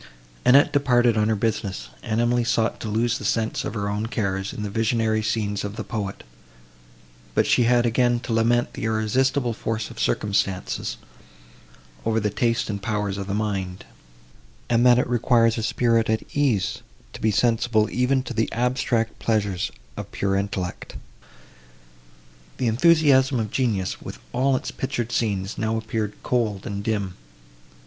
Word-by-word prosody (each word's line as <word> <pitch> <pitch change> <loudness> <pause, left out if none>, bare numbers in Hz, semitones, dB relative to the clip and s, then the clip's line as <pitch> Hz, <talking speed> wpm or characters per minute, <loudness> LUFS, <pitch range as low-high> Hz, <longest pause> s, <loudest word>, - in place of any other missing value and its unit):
Annette 140 +3 +6
departed 125 -5 +3
on 110 0 +2
her 110 - +2
business, 100 - -2
and 110 0 -1
Emily 120 +1 +2
sought 115 -1 0
to - - -5
lose 115 +2 0
the - - -8
sense 110 +2 0
of 110 - -4
her 100 -2 -2
own 105 +2 -2
cares, 100 -4 -2
in 105 - -6
the 105 - -3
visionary 110 0 +1
scenes 105 -2 -1
of 105 0 -5
the - - -4
poet; 100 -4 -5 1.1
but - - +3
she 120 - +3
had 120 0 +4
again 120 +1 +2
to 115 - -4
lament 120 +2 +2
the - - -5
irresistible 120 +3 +1
force 115 0 -3
of - - -11
circumstances 100 -2 -1 1.1
over 110 0 +1
the 105 -1 -1
taste 115 +1 0
and 100 -2 -4
powers 105 -2 -2
of 100 - -5
the 100 - -2
mind; 95 -4 -3 0.9
and 120 0 +4
that 120 -1 +7
it 125 - +1
requires 115 -1 +3
a - - -2
spirit 115 0 +1
at 110 0 +1
ease 130 -10 +1 0.3
to - - -9
be 110 - +2
sensible 115 -1 +2
even 130 +1 +1
to 125 - -6
the 115 -1 0
abstract 120 -2 0
pleasures 100 -5 0 0.3
of - - -7
pure 95 0 0
intellect. 100 -2 -3 1.6
The - - -1
enthusiasm 135 0 +4
of 110 -2 -3
genius, 110 -8 -1
with - - -8 0.2
all 130 +2 +2
its - - -3
pictured 120 -3 -3
scenes, 100 -4 -1
now 110 0 0
appeared 110 -2 -3
cold, 110 -6 -1
and 100 -3 -4
dim. 100 -4 -1
110 Hz, 160 wpm, -24 LUFS, 105-120 Hz, 1.6 s, that